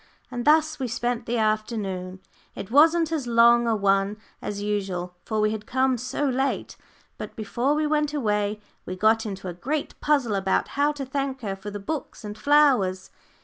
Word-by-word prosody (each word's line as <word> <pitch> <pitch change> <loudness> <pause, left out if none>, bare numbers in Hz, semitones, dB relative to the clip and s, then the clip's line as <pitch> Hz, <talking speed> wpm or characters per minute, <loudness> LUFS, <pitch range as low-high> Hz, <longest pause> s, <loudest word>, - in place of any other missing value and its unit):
And 245 -1 -4
thus 310 0 +3
we 260 - -1
spent 240 0 -2
the 240 +1 0
afternoon. 210 -4 -2 0.3
It 195 - -7
wasn't 320 +4 +5
as 295 -6 -2
long 235 0 +5
a 225 - +2
one 200 0 +1 0.2
as 205 -1 -4
usual, 195 -4 -3
for 220 - -1
we 215 0 +2
had 215 -1 -5
come 260 0 +2
so 255 +4 -2
late. 265 +1 -1 0.4
But - - -7
before 240 +6 -1
we 305 0 +1
went 300 -1 +1
away 210 -6 -1 0.2
we 185 - -6
got 220 +3 +2
into 195 -2 -6
a 180 - -4
great 280 - -3
puzzle 280 -7 +2
about 190 -1 0
how 290 +1 +1
to 280 -2 -5
thank 270 0 -3
her 200 -4 -3
for 195 +2 -8
the 205 0 -6
books 285 +6 -5
and 210 0 -6
flowers. 240 -8 +3
230 Hz, 185 wpm, -25 LUFS, 205-275 Hz, 0.4 s, wasn't